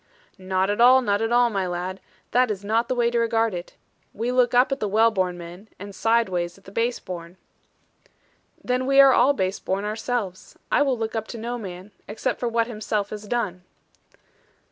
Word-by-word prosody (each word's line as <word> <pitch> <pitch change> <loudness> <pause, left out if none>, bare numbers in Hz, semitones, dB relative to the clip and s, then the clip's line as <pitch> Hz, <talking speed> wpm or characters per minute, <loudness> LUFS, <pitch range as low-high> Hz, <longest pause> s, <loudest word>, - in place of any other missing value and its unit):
'Not 190 +1 0
at 205 - -1
all, 255 +2 +7
not 205 -2 +1
at 225 +1 -1
all, 240 0 +4
my 195 -3 -1
lad. 180 +2 -4 0.3
That 250 0 +3
is 205 -2 -4
not 225 +3 +1
the 255 - -1
way 235 -1 +2
to 240 - +1
regard 230 -2 +1
it. 175 0 -7 0.4
We 235 +3 -2
look 250 -1 +2
up 255 +3 +4
at 275 - -1
the 210 - -1
well 225 +3 +4
born 185 -4 -1
men, 175 +5 -11
and 200 +1 -9
side 230 +3 +2
ways 175 -1 -3
at 195 - -21
the 195 - -13
base 235 +3 -1
born.' 175 0 -8 1.3
'Then 250 +1 -1
we 275 0 +4
are 275 -1 +8
all 280 +3 +4
base 190 -6 -2
born 195 +2 -2
ourselves. 215 -3 -4
I - - +3
will 270 -3 +2
look 225 0 -4
up 220 -1 -3
to 235 - -7
no 240 +2 -4
man, 190 -1 -9 0.2
except 230 +4 -3
for 240 - -1
what 230 0 +1
himself 215 -3 -3
has 210 0 -7
done.' 205 -6 -2
220 Hz, 210 wpm, -24 LUFS, 190-240 Hz, 1.3 s, are